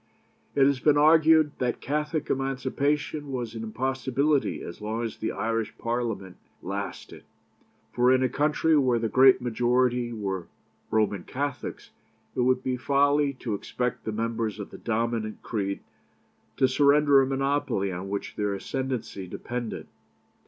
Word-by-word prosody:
It 135 - +5
has 140 -1 +2
been 150 +1 +4
argued 155 0 +6
that 125 -1 -1
Catholic 150 +2 -2
Emancipation 135 +2 -1
was 125 -3 -3
an 115 - -6
impossibility 130 +5 0
as 85 - -8
long 110 +2 -2
as 115 - -4
the 110 - -2
Irish 115 +2 -2
Parliament 115 -6 -3 0.3
lasted; 100 +2 -6 0.7
for 125 +1 +4
in 130 0 +4
a - - +4
country 150 +4 +2
where 130 -5 +3
the 115 0 0
great 130 0 +6
majority 125 0 +1
were 95 -5 -4 0.4
Roman 105 -3 +1
Catholics, 140 +4 -5 0.4
it - - -3
would 130 +1 +2
be 130 -1 -1
folly 140 +2 +2
to 115 - -2
expect 125 +4 -3
the 110 - -3
members 110 -1 -2
of 100 - -7
the - - -10
dominant 115 -1 -2
creed 100 -3 -2 0.8
to 130 - +4
surrender 140 +1 +5
a 135 - +1
monopoly 135 -7 0
on 90 +2 -5
which 100 0 -4
their 105 -1 -1
ascendency 125 -4 -4
depended. 120 +4 -5
125 Hz, 145 wpm, -27 LUFS, 110-140 Hz, 0.8 s, argued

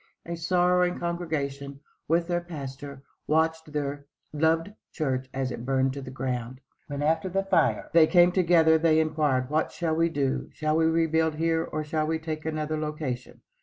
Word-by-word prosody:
A 170 - -4
sorrowing 180 +1 +2
congregation, 140 -5 -3 0.3
with 170 +2 +2
their 175 -1 0
pastor, 140 -4 -8 0.2
watched 160 0 +1
their 145 -1 -4 0.3
loved 165 +5 +1 0.2
church 130 -4 -2
as 130 -1 -2
it 115 - -6
burned 135 0 +1
to 140 - -6
the 130 - -8
ground. 130 -1 -4 0.3
When, 145 0 -4
after 160 +4 +1
the 195 +2 0
fire, 195 - +1
they 165 -1 +7
came 175 0 +5
together, 165 -3 +4
they 160 -1 +4
inquired, 150 -5 0
"What 155 +1 +1
shall 165 -2 -2
we 165 +1 +2
do? 140 -4 -1
Shall 155 0 -1
we 160 0 +3
rebuild 160 -1 +2
here 165 +1 +1
or 155 -1 -4
shall 155 0 -1
we 160 0 0
take 160 -1 -5
another 155 0 -2
location?" 150 -5 -5
155 Hz, 170 wpm, -27 LUFS, 140-165 Hz, 0.3 s, they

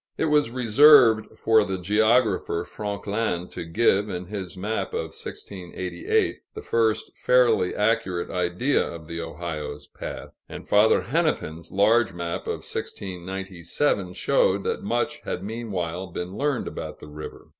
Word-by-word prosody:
It - - +1
was 150 -5 +3
reserved 120 -1 +6
for 110 -1 +4
the 95 -2 -3
geographer 110 +3 +2
Franquelin 100 -3 -3
to - - -6
give, 100 +4 +2
in 90 -1 -4
his 95 -2 -6
map 100 0 -3
of 80 0 -3
1688, 90 -2 -3 0.2
the - - -6
first 110 -2 0
fairly 120 -7 +3
accurate 95 -5 0
idea 90 +10 +1
of 85 -2 -7
the 85 +1 -4
Ohio's 75 -3 -5
path; - - -8
and - - -9
Father 105 +2 +5
Hennepin's 120 - -1
large 110 +3 +3
map 85 -1 -4
of - - -4
1697 95 - -3
showed 100 -2 +2
that - - -2
much 120 +8 -1
had 90 - -4
meanwhile 95 -5 -4
been 90 +2 -6
learned 140 0 -1
about - - -6
the - - -10
river. 75 +1 -9
100 Hz, 135 wpm, -25 LUFS, 90-115 Hz, 0.2 s, reserved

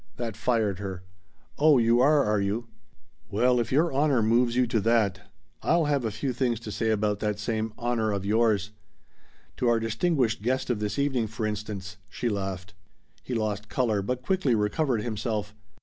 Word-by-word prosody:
That 115 -3 -4
fired 110 -6 0
her. 95 -2 -6 0.6
"Oh 150 -1 +6
you 115 0 +4
are, 145 +2 +5
are 105 -1 +1
you? 110 +4 -2 0.6
Well 125 +5 +2
if 120 - -2
your 155 +3 +2
honor 140 -4 +2
moves 120 +2 +2
you 125 0 +3
to 115 -1 0
that 100 -3 +1 0.3
I'll 170 -1 +2
have 145 -3 +1
a - - +1
few 130 +5 -3
things 120 -2 0
to 110 - -7
say 110 +2 -1
about 105 -1 +1
that 105 -1 -1
same 110 +1 -2
'honor' 120 -3 0
of 100 -1 -2
yours! 105 -2 +2 0.9
To 125 - 0
our 120 -1 +3
distinguished 115 - 0
guest 130 +3 0
of 115 - -1
this 105 +3 -3
evening, 135 -5 +1
for 110 +1 -4
instance," 100 -3 -5
she 120 +6 -2
laughed. 95 -2 -4 0.5
He 125 +9 -4
lost 105 -2 -2
color, 110 -6 +1
but 125 +5 -3
quickly 165 -8 +1
recovered 110 +2 0
himself. 110 -2 -3
115 Hz, 180 wpm, -27 LUFS, 105-125 Hz, 0.9 s, Oh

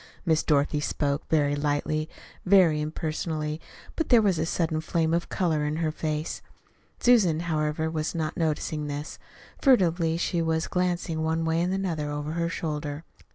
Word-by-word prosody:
Miss 160 -2 +3
Dorothy 145 0 +2
spoke 145 -1 -2
very 145 -2 +2
lightly, 150 +2 -1 0.3
very 180 -5 +5
impersonally; 155 0 -3 0.3
but 320 - -2
there 240 - +7
was 190 -5 +2
a 160 - 0
sudden 160 -2 0
flame 160 0 0
of 170 0 0
color 160 -5 0
in 150 +1 -1
her 160 -1 0
face. 155 0 -3 0.6
Susan, 195 -10 +4
however, 155 -1 -1
was 160 +1 -2
not 160 -1 -2
noticing 155 -2 -1
this. 145 +1 -5 0.4
Furtively 170 - +3
she 170 0 0
was 160 0 0
glancing 175 -3 -1
one 160 +1 0
way 165 +1 +1
and 180 +1 0
another 175 -6 -2
over 145 +1 -3
her 170 +1 -1
shoulder. 150 -2 -4
160 Hz, 155 wpm, -27 LUFS, 150-170 Hz, 0.6 s, there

